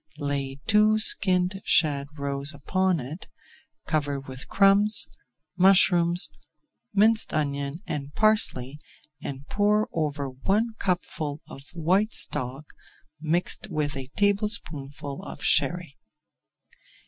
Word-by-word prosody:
Lay 140 -2 -3
two 215 0 +4
skinned 185 -2 +3
shad 140 -3 +2
roes 140 +1 -1
upon 185 +4 0
it, 145 +7 -8 0.6
cover 145 -3 -1
with 135 -1 -10
crumbs, 200 -2 +4 0.5
mushrooms, 175 -3 +4 0.6
minced 220 +2 +3
onion, 140 +2 -2
and 145 -4 -5
parsley, 150 - +1 0.4
and 140 0 -7
pour 210 +1 +1
over 150 -3 -2
one 195 - -1
cupful 155 -5 -2
of 135 - -10
white 185 +7 +1
stock 130 +4 -3 0.5
mixed 165 +6 -1
with 150 -4 -2
a 135 -1 -6
tablespoonful 155 -9 -2
of 150 - -9
Sherry. 175 -2 +1
155 Hz, 100 wpm, -25 LUFS, 140-195 Hz, 0.6 s, two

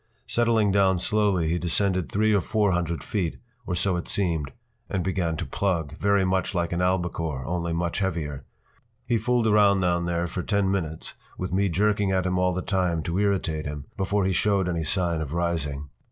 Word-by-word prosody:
Settling 115 -3 +2
down 95 -1 +3
slowly, 100 -3 +1
he 85 +2 0
descended 90 +2 0
three 110 +1 +2
or 100 - +3
four 105 +2 +1
hundred 85 -2 -1
feet, 90 -6 -2 0.3
or 90 - -1
so 95 +1 +1
it 85 - -5
seemed, 85 -7 0 0.4
and 95 -3 -1
began 85 -3 -1
to - - -3
plug, 85 -7 -1
very 100 +1 +2
much 95 +1 0
like 85 -1 0
an 85 - -1
albacore, 85 -7 -1
only 85 0 -2
much 85 +2 -1
heavier. 80 -7 -2 0.6
He 120 -2 +1
fooled 125 -1 +1
around 105 -3 +4
down 85 -1 +1
there 85 0 0
for 90 +1 -4
ten 100 -1 +1
minutes, 80 -5 -3 0.2
with 90 0 -4
me 100 +1 +2
jerking 100 +3 +1
at 95 -1 +1
him 90 0 0
all 90 0 +2
the 90 0 -3
time 90 -4 0
to 85 +4 -1
irritate 90 -7 0
him, 75 -1 -6
before 100 0 0
he 95 - +1
showed 100 +1 +2
any 85 -2 -1
sign 85 0 +1
of 75 -1 -5
rising. 75 -5 -2
90 Hz, 195 wpm, -25 LUFS, 85-100 Hz, 0.6 s, around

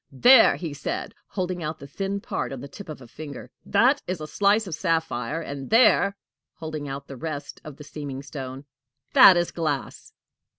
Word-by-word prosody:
"There!" 245 - +7
he 165 -5 -5
said, 140 - -4
holding 180 -2 -3
out 155 0 -4
the 140 - -11
thin 195 +7 -4
part 220 - -3
on 135 - -6
the 140 - -8
tip 190 +5 -11
of 150 -3 -8
a - - -13
finger, 140 -1 -9
"that 265 +4 +3
is 185 -2 -3
a 155 - -5
slice 205 +6 +2
of 180 - -6
sapphire; 160 -5 -1
and 140 -3 -7
there!" 215 -3 +4 0.4
holding 155 -3 -6
out 140 +1 -6
the 135 - -8
rest 150 +1 -6
of 150 -2 -10
the 150 - -10
seeming 140 -2 -7
stone, 135 -1 -7 0.5
"that 185 - +9
is 175 0 0
glass." 155 -5 -3
155 Hz, 185 wpm, -25 LUFS, 140-185 Hz, 0.5 s, that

